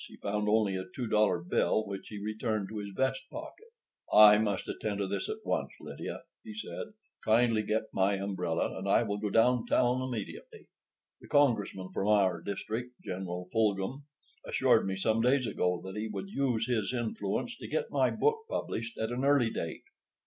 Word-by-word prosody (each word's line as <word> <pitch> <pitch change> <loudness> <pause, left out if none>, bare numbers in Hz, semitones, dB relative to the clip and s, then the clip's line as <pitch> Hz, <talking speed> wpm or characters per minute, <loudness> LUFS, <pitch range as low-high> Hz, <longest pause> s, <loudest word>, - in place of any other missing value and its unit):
He - - -13
found 105 +1 -1
only 105 -3 +3
a 95 0 -3
two 125 - -2
dollar 105 -4 +3
bill, 100 +4 +1
which 100 -1 -6
he 105 - -7
returned 110 0 -2
to 110 - -5
his 100 -1 -5
vest 135 0 +1
pocket. 320 +9 -9 0.4
"I 105 0 +9
must 105 -3 -1
attend 105 -2 -3
to 100 - 0
this 95 - -3
at 435 0 -5
once, - - 0
Lydia," - - -7 0.2
he 220 -2 -9
said. 220 -1 -6 0.3
"Kindly 115 0 +3
get 110 +1 0
me - - -17
my 95 +1 +2
umbrella 95 -4 -2
and - - -3
I - - +5
will 100 0 -2
go 105 0 -1
downtown 125 +2 +3
immediately. 120 -6 -6 0.5
The - - -14
congressman 105 -9 +2
from 100 - -1
our 100 -3 +3
district, 115 +5 -5
General 90 -1 -5
Fulghum, 110 +5 0 0.4
assured - - +3
me 95 0 -2
some 110 +3 +1
days 130 +2 +3
ago 90 -5 0
that 95 0 -7
he 105 +1 -2
would 100 -2 -5
use 125 -3 0
his 120 -1 0
influence 220 - -2
to - - -7
get 475 0 -2
my - - +3
book 445 0 +1
published 115 - -3
at 110 +1 -2
an 125 +2 -2
early 140 -5 +4
date. 85 - -4
110 Hz, 185 wpm, -31 LUFS, 100-125 Hz, 0.5 s, I